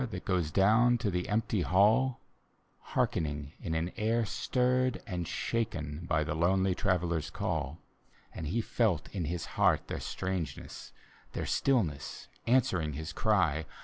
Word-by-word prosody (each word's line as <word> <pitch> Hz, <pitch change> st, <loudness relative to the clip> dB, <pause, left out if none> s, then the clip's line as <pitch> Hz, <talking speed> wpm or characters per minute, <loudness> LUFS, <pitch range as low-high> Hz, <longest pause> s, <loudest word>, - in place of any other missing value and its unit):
That 90 Hz, -5 st, -6 dB
goes 90 Hz, -5 st, +1 dB
down 110 Hz, +8 st, +4 dB
to 110 Hz, -4 st, -1 dB
the 90 Hz, 0 st, -2 dB
empty 105 Hz, -2 st, +1 dB
hall, 110 Hz, +8 st, +3 dB, 0.6 s
Hearkening 75 Hz, -1 st, -1 dB
in 80 Hz, -, -2 dB
an 85 Hz, +3 st, -1 dB
air 115 Hz, +2 st, +1 dB
stirred 125 Hz, +2 st, +1 dB
and 90 Hz, -2 st, -3 dB
shaken 85 Hz, -9 st, -2 dB
By 80 Hz, -2 st, +2 dB
the 75 Hz, 0 st, -2 dB
lonely 95 Hz, +4 st, +2 dB
Traveller's 90 Hz, -4 st, 0 dB
call: 75 Hz, -2 st, -2 dB, 0.6 s
And 80 Hz, -, -5 dB
he 115 Hz, +9 st, 0 dB
felt 110 Hz, -8 st, 0 dB
in 90 Hz, -5 st, -2 dB
his 85 Hz, +1 st, -3 dB, 0.2 s
heart -, -, +4 dB
their -, -, -3 dB
strangeness, 90 Hz, -4 st, -4 dB, 0.4 s
Their -, -, -3 dB
stillness 100 Hz, -, 0 dB, 0.2 s
answering 95 Hz, -, +2 dB
his 80 Hz, +4 st, -5 dB
cry. 85 Hz, -8 st, +2 dB
90 Hz, 140 wpm, -31 LUFS, 80-110 Hz, 0.6 s, down